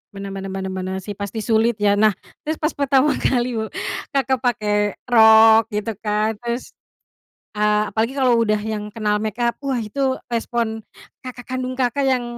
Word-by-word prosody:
Benar 195 0 -6
benar 195 0 -6
benar 190 0 -4
benar, 185 0 -4
sih, 205 - -6
pasti 205 +2 -4
sulit, 225 +1 +2
ya. 205 0 +3
Nah, 215 -2 +4 0.3
terus 310 - 0
pas 305 +1 -1
pertama 280 +1 +2
kali 245 -2 0
bu 220 - -3 0.5
Kakak 265 -1 +1
pakai 210 -4 0
rok 220 -1 +6
gitu 210 +2 -2
kan, 210 0 0
terus, 235 +1 -4 0.9
eee, 210 0 +2
apalagi 225 +4 -1
kalau 255 -4 +3
udah 215 -2 +1
yang 210 -1 -4
kenal 210 -2 0
makeup, 230 +3 -2
wah 275 -3 -2
itu 260 +5 -1 0.2
respon 230 -2 -2 0.4
kakak 245 -1 -7
kandung 255 0 -3
Kakak 260 +2 0
yang 255 -2 +1
225 Hz, 165 wpm, -21 LUFS, 210-250 Hz, 0.9 s, rok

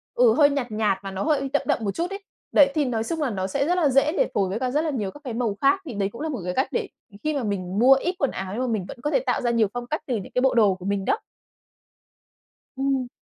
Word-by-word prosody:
ừ, 480 -2 +5
hơi 290 -2 +5
nhạt 265 -5 -2
nhạt 210 -3 +1
mà 195 - -5
nó 190 0 -3
hơi 280 -3 +1
đậm 290 - +3
đậm 290 - +1
một 200 - -1
chút 345 +2 -1
ấy. 395 +1 -7 0.3
Đấy, 275 -1 +6
thì 300 -2 +2
nói 230 -3 -1
chung 320 +6 -3
là 285 - +1
nó 190 -4 -2
sẽ 275 +8 0
rất 355 - +2
là 320 -5 +3
dễ 275 +3 +3
để - - +3
phối 195 -2 +1
với 210 +4 -2
cả 255 -1 -1
rất 300 +3 +2
là 325 - -1
nhiều 215 -9 -2
các 290 - -14
cái 255 -5 -5
màu 230 -3 -1
khác. 380 +8 +3
Thì 265 - -6
đấy 200 -1 -1
cũng 235 - -9
là 320 - -2
một 275 - -3
cái 180 - -2
cách 265 - +1
để - - -1 0.4
khi 310 - 0
mà 275 -4 -2
mình 195 -2 -2
mua 260 +3 +7
ít 355 +7 0
quần 275 - +1
áo 190 0 -5
nhưng 245 - -2
mà - - -1
mình 215 -6 -1
vẫn - - -8
có 295 - -1
thể - - +3
tạo 255 -2 -1
ra 240 - +1
nhiều 230 -2 +3
phong 245 0 -5
cách 305 - -2
từ 250 - 0
những 195 - -5
cái 250 - +3
bộ 265 0 +3
đồ 210 -5 +4
của 185 0 -11
mình 200 -1 -1
đó. 425 - +1 1.6
Ừm. 270 -2 0
255 Hz, 310 wpm, -24 LUFS, 210-290 Hz, 1.6 s, mua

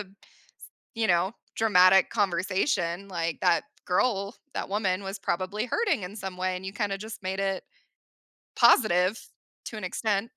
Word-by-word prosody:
s - - -5 0.9
you 225 -1 0
know, 180 +2 +2 0.2
dramatic 190 -3 +5
conversation 190 - 0
like 170 -3 -2
that 175 -2 +3 0.2
girl, 200 +1 0 0.2
that - - -3
woman 195 -1 0
was 195 +1 -5
probably 195 +4 -2
hurting 330 - 0
in 180 +3 -6
some 190 -3 -6
way 185 0 -1
and 180 - -8
you 190 - -5
kinda 205 -2 -2
just 220 +1 -8
made 190 +1 -2
it. 195 -1 -1 0.9
Positive, 185 -1 +4 0.5
to 225 - -6
an 215 - -6
extent. 205 +4 -1
195 Hz, 150 wpm, -27 LUFS, 185-210 Hz, 0.9 s, dramatic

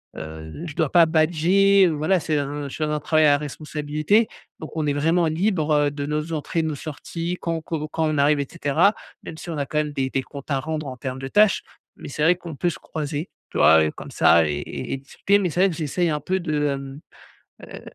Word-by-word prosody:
heu, 80 - -8
je 155 - -6
dois 155 -4 +1
pas 170 -2 +7
badger, 175 +5 +4
heu. - - +1
Voilà 155 +4 +1
c'est 155 -1 0
un 145 0 -4
je - - -10
suis 155 - -2
dans 150 - -2
un 150 -1 -1
travail 155 0 +3
à 145 -1 +5
responsabilité 150 +7 0 0.3
donc 155 - -8
on 150 -1 0
est 145 - +1
vraiment 165 +3 +2
libre, 160 -2 0
heu, 145 -1 +3
de 145 -1 -4
nos 150 +2 -3
entrées 160 +2 -1
de - - -1
nos 150 - -3
sorties, 165 +4 -5
quand 165 -1 -2
co 155 -1 -4
quand 160 0 0
on 155 -1 -1
arrive 145 +1 +3
et 140 - -2
cetera. 170 +5 +2 0.3
Même 160 - -8
si 170 - -9
on 160 - -4
a 140 - -1
quand 150 +3 -1
même 150 -1 -1
des 130 -1 -1
des 135 0 -1
comptes 140 +1 -11
à 135 -1 +1
rendre 155 -1 -4
en 130 - -6
termes 130 +2 -5
de 135 - -5
tâches, 210 +6 +3 0.3
mais - - -9
c'est 145 +3 -5
vrai 180 +3 +5
qu'on 170 -4 -8
peut 175 +5 0
se - - -7
croiser, 150 +1 -4 0.2
tu - - -5
vois? 80 0 +6
Et 75 - -1
comme - - -10
ça 85 -2 +5
et 75 -1 -2 0.3
et - - -1
discuter 165 +9 0
mais 180 -3 0
c'est 175 - -3
vrai 195 - +5
que 165 - -5
j'essaie 170 +2 -1
un 150 -1 -1
peu 190 +1 -1
de, 155 -4 -1
hem, 140 +1 -5 0.6
heu, - - -10
155 Hz, 250 wpm, -23 LUFS, 145-170 Hz, 0.6 s, pas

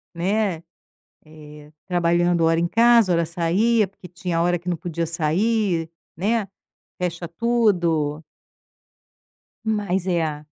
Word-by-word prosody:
Né, 185 -1 -1 0.6
eh, 150 -1 -14 0.2
trabalhando 175 -1 +2
hora 165 0 +3
em 170 - +1
casa, 230 -1 +4
hora 170 -1 +2
saía, 190 +7 +1
porque 190 -1 -14
tinha 180 -1 -4
a - - +2
hora 175 +1 +2
que 180 +2 -6
não 175 - -1
podia 170 -1 -3
sair, 170 +2 0 0.3
né, 210 +3 0 0.5
fecha 175 -1 -3
tudo. 170 -8 +1 1.4
Mas 200 -4 -1
é. 160 -4 -1
175 Hz, 120 wpm, -22 LUFS, 165-200 Hz, 1.4 s, casa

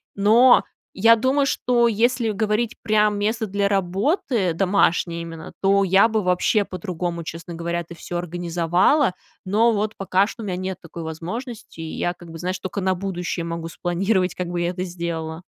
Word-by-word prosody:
Но 225 +5 +6 0.3
я 230 +4 +6
думаю, 265 +4 +2
что 240 -3 +2
если 235 +1 +1
говорить 215 +2 0
прям 210 -1 +2
"место 220 +2 -1
для 200 +1 0
работы", 195 - 0
домашнее 175 -2 +1
именно, 165 -1 -9
то 200 0 +4
я 195 +3 +5
бы 220 -1 0
вообще 180 +4 +2
по-другому, 175 -2 -4
честно 165 +2 -7
говоря, 170 +1 -2
это 170 +1 -11
всё 175 +1 -5
организовала. 175 - +1 0.3
Но 220 +5 +3
вот 215 +1 -1
пока 195 +1 +2
что 225 +1 -8
у - - -5
меня 185 - -2
нет 185 0 -4
такой 165 0 -9
возможности, 180 +5 -6
и 160 - -6
я 175 - 0
как 175 -1 -14
бы, 165 - -8
знаешь, 185 +2 -3
только 190 +2 -4
на 190 0 +2
будущее 180 -2 -3
могу 165 0 -4
спланировать, 185 +2 0
как 180 - -3
бы 175 0 -2
я 175 - 0
это 180 0 -3
сделала. 170 -2 -4
185 Hz, 180 wpm, -22 LUFS, 170-215 Hz, 0.3 s, Но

